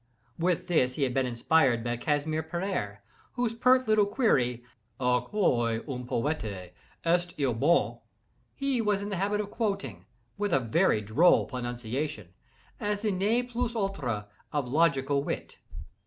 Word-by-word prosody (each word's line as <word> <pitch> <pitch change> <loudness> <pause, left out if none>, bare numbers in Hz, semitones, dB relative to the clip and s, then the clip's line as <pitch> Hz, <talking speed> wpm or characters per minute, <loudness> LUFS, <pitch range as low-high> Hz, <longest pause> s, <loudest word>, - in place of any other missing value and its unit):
With 175 0 +1
this 130 -7 +2
he 145 - 0
had 130 -2 0
been 130 0 +1
inspired 120 0 +2
by 120 0 -1
Casimir 150 +4 -1
Perier, 160 - -3 0.3
whose 245 -2 -1
pert 255 +2 +3
little 215 -2 +4
query 125 - +1 0.4
"A 125 -1 +2
quoi 120 - +1
un 125 -3 -5
poete 110 - -3 0.3
est 175 +1 +1
il 135 -4 +1
bon?" 145 +9 +2 0.6
he 275 -3 0
was 205 -2 +1
in 205 - -4
the 195 - -2
habit 205 +3 0
of 205 -1 -3
quoting, 135 - -3 0.3
with 205 -3 0
a 135 - +5
very 125 - +2
droll 115 - +4
pronunciation, 120 - -4 0.5
as 205 0 -2
the 215 - +1
ne 210 +6 +1
plus 245 -1 -3
ultra 140 - -2 0.2
of 145 -4 -1
logical 140 -1 +2
wit. - - -5
155 Hz, 150 wpm, -28 LUFS, 125-205 Hz, 0.6 s, a